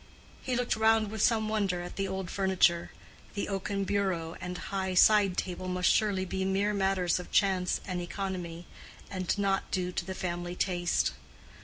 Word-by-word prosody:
He 255 - -2
looked 245 0 0
round 220 -1 +3
with 220 -2 -3
some 220 -1 +3
wonder 200 -5 0
at 175 - -8
the 195 0 -1
old 190 -2 -4
furniture: 185 -3 +2 0.5
the 200 - -2
oaken 195 0 -2
bureau 185 -5 -1
and 180 0 -4
high 190 -1 -3
side 200 -1 +5
table 185 0 -3
must 180 -1 +2
surely 200 -3 +1
be 190 +1 -2
mere 195 +2 +1
matters 190 -3 +1
of 180 - -9
chance 185 -2 +2
and 180 -2 -3
economy, 175 -2 -5 0.5
and 185 0 -1
not 195 -1 0
due 180 -1 -1
to 180 - -2
the 190 +1 -6
family 175 -1 -3
taste. 175 -2 +1
190 Hz, 170 wpm, -30 LUFS, 180-200 Hz, 0.5 s, side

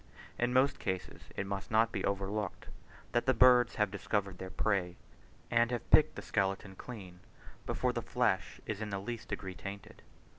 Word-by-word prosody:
In 120 +1 +2
most 130 +2 +3
cases 95 -2 -4
it - - -2
must 95 -1 -4
not 115 +1 +4
be - - -3
overlooked, 100 0 -2 0.4
that 120 +2 +1
the 130 - +4
birds 125 0 +6
have 105 -2 +1
discovered 100 -1 -2
their 95 - -5
prey, 95 -4 0 0.6
and 115 0 +4
have 120 -2 -3
picked - - +6
the - - -6
skeleton 95 0 -1
clean, 95 -6 -9 0.5
before - - 0
the - - -2
flesh - - 0
is 110 -1 -4
in 110 - -3
the 100 - -2
least 115 +4 -5
degree 95 -2 -4
tainted. 100 +1 -8
100 Hz, 175 wpm, -33 LUFS, 95-115 Hz, 0.6 s, birds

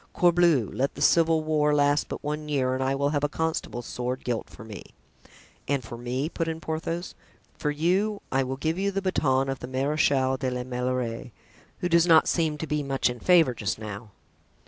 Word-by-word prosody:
Corbleu! 170 - +3
let 135 +2 -1
the - - -9
civil 165 -1 +4
war 150 -1 +2
last 145 0 +2
but - - -6
one 150 +1 -4
year 130 -3 +1
and 130 - -2
I 135 +1 +1
will 140 +1 +1
have 145 -1 -1
a 145 - +2
constable's 160 -6 -3
sword 125 +1 -4
gilt 120 -2 -3
for - - -12
me." 110 -3 -11 0.7
"And 140 -2 0
for 115 - -8
me?" 125 +4 -2
put 165 0 -3
in 160 0 -3
Porthos. 165 +2 -4 0.4
"For 150 - -2
you? 185 +8 +1
I 135 - +2
will 130 0 -3
give 160 +5 -1
you 200 +1 +1
the 195 0 -3
baton 135 -8 +1
of 135 -1 -3
the 125 - -7
Marechal 130 0 +1
de 130 0 -1
la 125 0 -3
Meilleraie, 125 -1 -3 0.5
who 180 - +1
does 170 0 +4
not 160 -2 +6
seem 160 -3 +1
to 160 - -4
be 150 0 -1
much 135 -3 0
in 120 - -8
favor 165 -6 +4
just 105 -3 -3
now.") 110 0 -7
145 Hz, 205 wpm, -26 LUFS, 130-160 Hz, 0.7 s, not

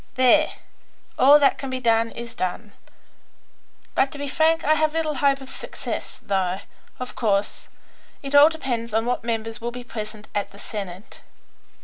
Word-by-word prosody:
There; 260 +5 +4 0.7
all 280 +3 +8
that 285 -2 +3
can 270 - -4
be 260 0 -3
done 230 -2 +2
is 235 0 -8
done, 195 +3 -3 1.2
but, 270 - +2
to 290 - -8
be 285 0 -4
frank, 320 +3 +2
I 305 - +5
have 310 0 +1
little 320 -2 0
hope 275 0 +2
of 265 - -10
success, - - -6
though, 190 -1 0 0.4
of 255 0 -6
course, 205 -3 0 0.6
it 275 0 -5
all 285 +2 +9
depends 240 -8 -3
on 225 +1 +2
what 245 -1 -1
members 225 0 -3
will 235 - -2
be 245 +1 -8
present 215 -2 -7
at 205 -1 -1
the 200 - -16
Senate. 200 -2 -7
240 Hz, 165 wpm, -23 LUFS, 215-280 Hz, 1.2 s, all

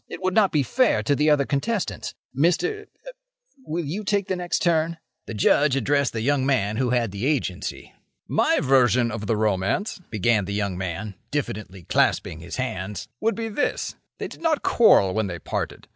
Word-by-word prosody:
It - - -7
would 185 0 +1
not 205 -2 +4
be 150 -3 +2
fair 250 - +2
to 145 - +2
the 150 +2 +2
other 145 -2 +4
contestants. 185 +11 -2 0.2
Mr.—er—will 420 - -3
you 185 +9 -4
take 200 -1 0
the 190 - +1
next 180 -1 -2
turn?" 165 -1 +1 0.3
The 115 - -5
Judge 140 +6 +3
addressed 140 -1 +1
the 110 - -2
young 140 +2 +1
man 110 -6 +1
who 125 0 +1
had 120 -4 +1
the 100 +6 -2
Agency. 130 -12 -2 0.3
"My - - +2
version 125 -3 +3
of 105 -1 -5
the 110 - +1
romance," 105 - 0
began 110 -1 +1
the 100 +2 -4
young 100 -3 -1
man, 95 +3 -4 0.2
diffidently 105 -10 -4
clasping 80 - +1
his 85 +2 -7
hands, 105 -6 -4
"would 225 +1 +1
be 225 0 -3
this: 225 +7 -1 0.2
They - - -4
did - - -12
not 320 -3 +1
quarrel 100 - +5
when 110 -1 0
they 85 -2 -5
parted. - - -4
Mr. - - -38
135 Hz, 185 wpm, -24 LUFS, -, 0.3 s, quarrel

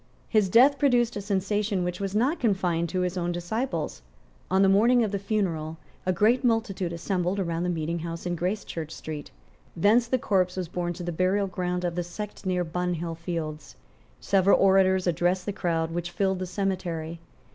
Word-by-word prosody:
His 210 -3 +2
death 265 +8 +6
produced 245 -5 +3
a 205 - -3
sensation 200 0 0
which 180 0 -3
was 195 0 -3
not 260 +10 +2
confined 180 -7 +1
to 185 - -1
his 180 0 -1
own 175 0 -1
disciples. 175 - -3 0.5
On 190 +1 +4
the - - +5
morning 230 +5 +5
of 215 - -1
the 200 - -1
funeral 175 -7 -2 0.3
a - - +4
great 220 +8 +3
multitude 220 -7 0
assembled 180 +2 -1
round 170 -3 -1
the 180 - 0
meeting 170 0 -2
house 165 +1 -6
in 175 0 -1
Gracechurch 175 -3 -3
Street. 150 -2 -7 0.5
Thence 215 +7 +4
the 255 - +2
corpse 185 -6 +1
was 185 -2 -2
borne 175 0 -2
to 175 - -7
the 175 - -2
burial 185 +4 +1
ground 180 -1 -2
of 175 - -1
the 175 +1 -2
sect 195 +3 -7
near 180 -1 +1
Bunhill 175 0 -2
Fields. 165 -2 -5 0.4
Several 195 0 +3
orators 190 -1 +4
addressed 175 +1 +1
the 205 - -2
crowd 165 -3 -1
which 175 +1 -3
filled 190 +1 0
the 185 - -3
cemetery. 175 -4 -3
185 Hz, 185 wpm, -26 LUFS, 170-200 Hz, 0.5 s, death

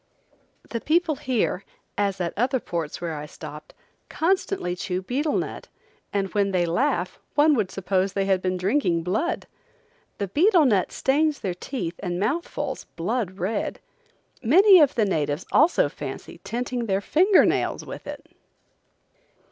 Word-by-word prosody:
The 230 - -4
people 320 -1 +1
here, 240 -7 -1 0.3
as 200 -2 0
at 175 -2 -2
other 255 +4 +1
ports 165 -8 -4
where 170 -2 -3
I 150 0 -6
stopped, 150 0 -10 0.3
constantly 365 - 0
chew 180 0 -3
betel 285 +8 0
nut, - - -4 0.4
and 195 -2 -1
when 200 -2 +2
they 180 -2 +1
laugh 185 - 0 0.2
one 300 +1 +5
would 215 -8 +1
suppose 190 0 -1
they 195 -1 0
had 190 -1 +2
been 185 0 -1
drinking 180 - +1
blood. 215 - -1 0.7
The 200 - -2
betel 335 - +4
nut 205 -8 +2
stains 295 +2 +1
their 190 -3 -2
teeth 175 -3 -5
and 175 -2 -3
mouthfuls 280 - -2
blood 190 +2 -2
red. 200 +4 -2 0.6
Many 370 - +7
of 295 -4 +4
the 220 - +3
natives 150 -3 -1
also 315 - +4
fancy 145 +3 -8
tinting 240 +1 -3
their 195 -1 +1
finger 370 - +5
nails - - 0
with - - -9
it. - - -7
205 Hz, 150 wpm, -24 LUFS, 180-285 Hz, 0.7 s, Many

